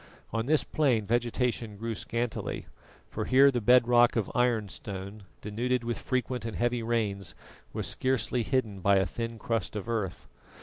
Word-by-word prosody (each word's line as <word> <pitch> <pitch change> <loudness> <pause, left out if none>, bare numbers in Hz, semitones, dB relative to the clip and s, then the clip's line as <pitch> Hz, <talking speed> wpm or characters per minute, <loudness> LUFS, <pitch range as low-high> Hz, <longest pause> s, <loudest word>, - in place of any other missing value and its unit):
On 115 +1 -1
this 155 0 +4
plain 125 -9 +1
vegetation 120 -1 -1
grew 115 +2 -3
scantily, 115 +2 -3 0.5
for - - -3
here 135 +2 +6
the 120 -2 -1
bed 125 +2 +5
rock 120 0 +5
of 110 -5 -1
ironstone, 105 -4 -2 0.2
denuded 120 +4 -1
with 120 0 -2
frequent 125 -2 -2
and 115 -1 -4
heavy 120 0 +1
rains, 105 -5 -1 0.4
was - - -3
scarcely 130 -1 0
hidden 115 -4 -1
by 100 +2 +4
a 95 0 +3
thin 115 0 -4
crust 115 -1 -2
of 105 +1 -4
earth. 105 -6 -2
115 Hz, 160 wpm, -29 LUFS, 105-125 Hz, 0.5 s, here